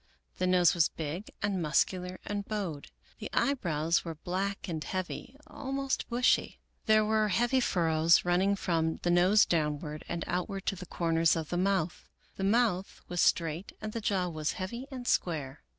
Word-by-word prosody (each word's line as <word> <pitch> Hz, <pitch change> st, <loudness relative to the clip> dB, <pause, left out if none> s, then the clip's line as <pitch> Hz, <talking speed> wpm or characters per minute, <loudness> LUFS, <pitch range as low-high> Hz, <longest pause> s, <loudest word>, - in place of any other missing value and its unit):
The 185 Hz, -, +1 dB
nose 180 Hz, -2 st, +5 dB
was 170 Hz, -3 st, +3 dB
big 160 Hz, +5 st, -5 dB
and 200 Hz, -3 st, 0 dB
muscular 180 Hz, +3 st, 0 dB
and 205 Hz, -1 st, -3 dB
bowed. 195 Hz, -9 st, -4 dB, 0.3 s
The -, -, -5 dB
eyebrows 170 Hz, -, +1 dB
were 165 Hz, -2 st, -5 dB
black 190 Hz, +5 st, -3 dB
and 160 Hz, -3 st, -3 dB
heavy, 185 Hz, +7 st, -5 dB
almost 275 Hz, -2 st, -3 dB
bushy. 245 Hz, +1 st, +2 dB, 0.3 s
There 215 Hz, 0 st, +5 dB
were 215 Hz, 0 st, +2 dB
heavy 240 Hz, +6 st, +2 dB
furrows, 165 Hz, -7 st, +3 dB
running 185 Hz, +3 st, +2 dB
from 165 Hz, -4 st, 0 dB
the 175 Hz, -, +2 dB
nose 185 Hz, +5 st, +5 dB
downward 150 Hz, -1 st, -1 dB
and 170 Hz, -1 st, -2 dB
outward 185 Hz, +2 st, -3 dB
to -, -, 0 dB
the 180 Hz, -1 st, -9 dB
corners 165 Hz, 0 st, +2 dB
of 160 Hz, -2 st, -4 dB
the 175 Hz, -, -1 dB
mouth. 185 Hz, -2 st, 0 dB, 0.3 s
The 195 Hz, -, -4 dB
mouth 200 Hz, -2 st, +1 dB
was 175 Hz, -1 st, 0 dB
straight 165 Hz, +2 st, +1 dB
and 215 Hz, 0 st, -5 dB
the 230 Hz, -, -3 dB
jaw 190 Hz, -3 st, 0 dB
was 155 Hz, -2 st, -2 dB
heavy, 235 Hz, +6 st, -5 dB
and 255 Hz, -3 st, -7 dB
square. 150 Hz, -5 st, -1 dB
180 Hz, 165 wpm, -30 LUFS, 165-205 Hz, 0.3 s, nose